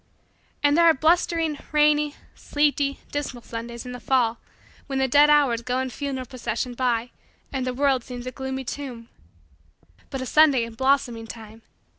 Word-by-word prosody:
And 290 Hz, 0 st, +4 dB
there 340 Hz, +1 st, +5 dB
are 330 Hz, -, +6 dB
blustering, 325 Hz, 0 st, +1 dB
rainy, 300 Hz, 0 st, +3 dB, 0.2 s
sleety, 290 Hz, -1 st, 0 dB
dismal, 265 Hz, -4 st, -4 dB
Sundays 235 Hz, +1 st, -7 dB
in 250 Hz, -, -6 dB
the 250 Hz, -, -7 dB
fall 240 Hz, -3 st, +1 dB, 0.5 s
when 270 Hz, -1 st, -3 dB
the 265 Hz, 0 st, +2 dB
dead 290 Hz, +3 st, +6 dB
hours 280 Hz, -6 st, +4 dB
go 250 Hz, +1 st, -2 dB
in 260 Hz, 0 st, -2 dB
funeral 270 Hz, -1 st, -4 dB
procession 245 Hz, 0 st, -4 dB
by 240 Hz, -1 st, -1 dB, 0.4 s
and 260 Hz, -2 st, -2 dB
the 255 Hz, -, -1 dB
world 270 Hz, -2 st, +2 dB
seems 245 Hz, 0 st, -8 dB
a 255 Hz, -, -4 dB
gloomy 265 Hz, 0 st, -5 dB
tomb. 245 Hz, -3 st, -7 dB, 1.0 s
But 270 Hz, -, -4 dB
a -, -, -3 dB
Sunday 285 Hz, -3 st, +5 dB
in 230 Hz, 0 st, -6 dB
blossoming 245 Hz, -2 st, 0 dB
time! 220 Hz, 0 st, -11 dB
260 Hz, 165 wpm, -24 LUFS, 240-290 Hz, 1.0 s, are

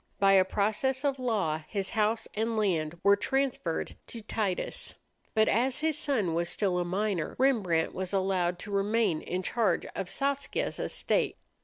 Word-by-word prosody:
By 195 Hz, 0 st, +4 dB
a 190 Hz, -1 st, +7 dB
process 220 Hz, +8 st, 0 dB
of 275 Hz, -2 st, 0 dB
law 200 Hz, -11 st, 0 dB
his 195 Hz, -2 st, -2 dB
house 220 Hz, 0 st, 0 dB
and 225 Hz, +1 st, -1 dB
land 170 Hz, -6 st, 0 dB
were 200 Hz, 0 st, +6 dB
transferred 250 Hz, -6 st, -1 dB
to 230 Hz, -2 st, -8 dB
Titus. 205 Hz, -4 st, -2 dB, 0.4 s
But 220 Hz, 0 st, +4 dB
as 250 Hz, +6 st, +1 dB
his 315 Hz, -1 st, +1 dB
son 235 Hz, -, 0 dB
was 170 Hz, +1 st, 0 dB
still 185 Hz, -1 st, 0 dB
a -, -, +1 dB
minor, 190 Hz, -1 st, -1 dB
Rembrandt 205 Hz, -12 st, +2 dB
was 185 Hz, -1 st, -3 dB
allowed 185 Hz, -3 st, +1 dB
to 205 Hz, -, -7 dB
remain 200 Hz, -3 st, +1 dB
in 185 Hz, +1 st, -3 dB
charge 225 Hz, +2 st, +1 dB
of 195 Hz, -2 st, -3 dB
Saskia's 280 Hz, 0 st, -2 dB
estate. -, -, 0 dB
205 Hz, 160 wpm, -29 LUFS, 180-230 Hz, 0.4 s, a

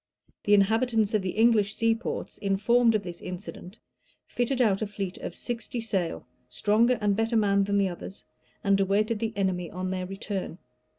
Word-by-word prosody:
The 205 Hz, -, +6 dB
inhabitants 220 Hz, +1 st, +2 dB
of 215 Hz, -, +2 dB
the 190 Hz, -, -2 dB
English 220 Hz, -3 st, +4 dB
seaports, 230 Hz, 0 st, -1 dB
informed 225 Hz, +4 st, +3 dB
of 210 Hz, -, 0 dB
this 175 Hz, -2 st, -8 dB
incident, 185 Hz, +2 st, -8 dB, 0.5 s
fitted 245 Hz, +2 st, -1 dB
out 210 Hz, -5 st, +3 dB
a 215 Hz, -, -1 dB
fleet 195 Hz, -2 st, -5 dB
of -, -, -6 dB
sixty 240 Hz, 0 st, -4 dB
sail, 195 Hz, -7 st, -2 dB, 0.2 s
stronger 230 Hz, +4 st, +2 dB
and 205 Hz, -2 st, +1 dB
better 225 Hz, +2 st, +1 dB
manned 200 Hz, -2 st, +3 dB
than 200 Hz, 0 st, +1 dB
the 195 Hz, -1 st, +2 dB
others, 180 Hz, +2 st, -8 dB, 0.4 s
and 200 Hz, -1 st, +3 dB
awaited 205 Hz, +3 st, +1 dB
the 225 Hz, 0 st, -1 dB
enemy 180 Hz, -3 st, -1 dB
on 185 Hz, +1 st, -4 dB
their 185 Hz, -1 st, -3 dB
return. 195 Hz, -2 st, -5 dB
205 Hz, 170 wpm, -27 LUFS, 195-225 Hz, 0.5 s, The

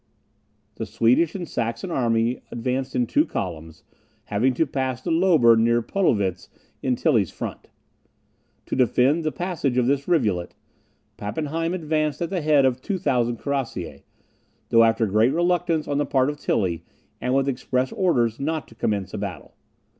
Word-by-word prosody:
The 110 Hz, -, -4 dB
Swedish 115 Hz, -, +2 dB
and 180 Hz, -3 st, -4 dB
Saxon 120 Hz, -, -3 dB
army 115 Hz, -2 st, +1 dB
advanced 130 Hz, +3 st, -3 dB
in 125 Hz, -, +2 dB
two 295 Hz, -, +2 dB
columns, 80 Hz, -, -6 dB, 0.4 s
having 120 Hz, +5 st, +1 dB
to 160 Hz, -, +2 dB
pass 130 Hz, -3 st, -2 dB
the 130 Hz, -, -4 dB
Lober 160 Hz, -9 st, +5 dB
near 115 Hz, +1 st, +2 dB
Podelwitz, 100 Hz, -, 0 dB, 0.3 s
in 130 Hz, -1 st, +1 dB
Tilly's 115 Hz, -, +2 dB
front. -, -, -7 dB, 1.0 s
To -, -, -3 dB
defend 130 Hz, +5 st, +3 dB
the 155 Hz, -, 0 dB
passage 160 Hz, -8 st, -2 dB
of 125 Hz, -, +3 dB
this 140 Hz, +2 st, 0 dB
rivulet, 105 Hz, -, 0 dB, 0.6 s
Pappenheim 160 Hz, -, -2 dB
advanced 155 Hz, -4 st, -1 dB
at 170 Hz, -1 st, -3 dB
the 185 Hz, -3 st, -1 dB
head 150 Hz, -3 st, +4 dB
of 130 Hz, -1 st, +1 dB
2000 125 Hz, -, 0 dB
cuirassiers, 115 Hz, -, -4 dB, 0.7 s
though 115 Hz, 0 st, +6 dB
after 115 Hz, 0 st, +3 dB
great 110 Hz, +6 st, +2 dB
reluctance 175 Hz, -2 st, +1 dB
on 145 Hz, 0 st, 0 dB
the 145 Hz, -, +1 dB
part 135 Hz, +1 st, +2 dB
of 145 Hz, -, -11 dB
Tilly, 90 Hz, -6 st, -1 dB, 0.4 s
and 125 Hz, +1 st, 0 dB
with 135 Hz, 0 st, +2 dB
express 130 Hz, -1 st, -1 dB
orders 120 Hz, -, +1 dB
not 155 Hz, +2 st, -2 dB
to -, -, -15 dB
commence 105 Hz, -4 st, -2 dB
a 105 Hz, -, -4 dB
battle. 100 Hz, -3 st, -6 dB
130 Hz, 155 wpm, -23 LUFS, 115-155 Hz, 1.0 s, though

